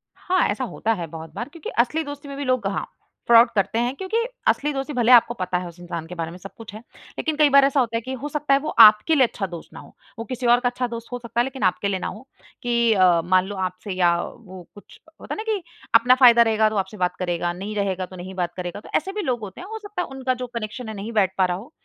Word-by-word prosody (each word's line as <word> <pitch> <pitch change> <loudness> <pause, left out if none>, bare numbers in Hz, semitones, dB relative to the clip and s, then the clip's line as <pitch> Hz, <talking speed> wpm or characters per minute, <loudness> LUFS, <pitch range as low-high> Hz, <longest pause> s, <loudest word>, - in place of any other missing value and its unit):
हाँ, 370 0 0
ऐसा 210 +5 -2
होता 225 -2 -1
है 175 -6 -5
बहुत 160 0 -10
बार 240 - -5
क्योंकि 320 +1 -8
असली 305 +7 +2
दोस्ती 285 -1 -8
में 280 0 -7
भी 285 - -3
लोग 255 -5 0
हाँ 195 - -2 0.4
फ्रॉड 235 0 +7
करते 210 +3 +1
हैं। 240 +2 0
क्योंकि 380 +7 -3 0.3
असली 295 +1 +2
दोस्ती 275 +2 -4
भले 240 -1 +2
ही - - +11
आपको 240 0 +4
पता 185 -5 -2
है 180 0 -5
उस 170 0 -13
इंसान 170 -2 -6
के 180 - -8
बारे 165 -1 -4
में 175 - -10
सब 195 +2 -11
कुछ 225 -3 -10
है 215 - -8 0.4
लेकिन 315 -2 -1
कई 300 -1 +5
बार 280 0 +6
ऐसा 275 0 +2
होता 230 -3 0
है - - -3
कि 260 +3 -6
हो 295 - -3
सकता 295 -1 0
है 275 - +4
वो 305 - -4 0.2
आपके 215 +9 +5
लिए 265 -3 +5
अच्छा 200 - -4
दोस्त 170 -2 -9
ना - - -9
हो। - - -15 0.2
वो 230 - -4
किसी 255 0 -5
और 240 +1 +5
का 245 0 +1
अच्छा 250 0 -3
दोस्त 235 -1 -8
हो 245 - -4
सकता 235 0 -4
है, - - +5
लेकिन 265 -3 -6
आपके 185 +2 +1
लिए 195 -2 -1
ना - - -3
हो 240 +5 -9 0.4
कि 235 -1 +2
अ, 180 -4 +4
मान 185 +2 +2
लो 205 +1 -6
आपसे 185 +1 -4
या 175 -2 +3
वो 190 -5 -11
कुछ 205 - -16 0.2
होता - - -6
है - - -6
ना 430 - -4
कि 410 -3 -1 0.3
अपना 245 +2 +6
फ़ायदा 245 -2 +7
रहेगा 220 -1 +3
तो 215 - -5
आपसे 195 +2 -3
बात 180 -1 0
करेगा, 175 -1 -1
नहीं 200 +4 -6
रहेगा 190 -2 -1
तो 185 - -13
नहीं 185 +1 -8
बात 175 -2 -2
करेगा। 180 +2 -5
तो - - -14
ऐसे 380 +5 0
भी 420 +1 -3
लोग 255 -9 -1
होते 205 -4 -9
हैं, 370 - -9
हो 445 +1 -6
सकता 410 -3 -5
है - - -4
उनका 265 -1 -2
जो 250 - -3
कनेक्शन 225 +1 -5
है 220 - -6
नहीं 205 +3 -6
बैठ 195 -4 +2
पा 190 - +4
रहा 180 -1 -2
हो। 230 +10 -12
230 Hz, 290 wpm, -23 LUFS, 185-260 Hz, 0.4 s, ही